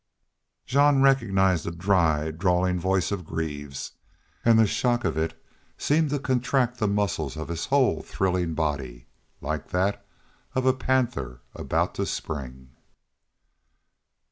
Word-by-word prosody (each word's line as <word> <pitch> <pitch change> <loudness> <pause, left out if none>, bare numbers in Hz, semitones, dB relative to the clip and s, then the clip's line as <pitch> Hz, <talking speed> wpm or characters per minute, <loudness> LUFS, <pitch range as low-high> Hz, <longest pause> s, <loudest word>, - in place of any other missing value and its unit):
Jean 140 +1 +4
recognized 95 - +3
the - - -3
dry, 85 -4 +1
drawling 90 +2 +1
voice 95 0 0
of 100 -3 -2
Greaves, 75 -4 -5 0.5
and 115 -1 +5
the 110 - +6
shock 120 +3 0
of - - 0
it 80 +1 -2 0.4
seemed 155 +1 +2
to 145 - 0
contract 125 -2 0
the 110 - +1
muscles 95 -9 -1
of 80 +1 -5
his 85 0 -3
whole 130 - +2
thrilling 90 -3 -1
body, 70 -6 -3 0.4
like 75 +1 -4
that 95 +3 0 0.5
of 130 0 0
a 130 - +5
panther 120 - -1
about - - -1
to - - -2
spring. 65 -3 -6
90 Hz, 130 wpm, -26 LUFS, 80-125 Hz, 0.5 s, the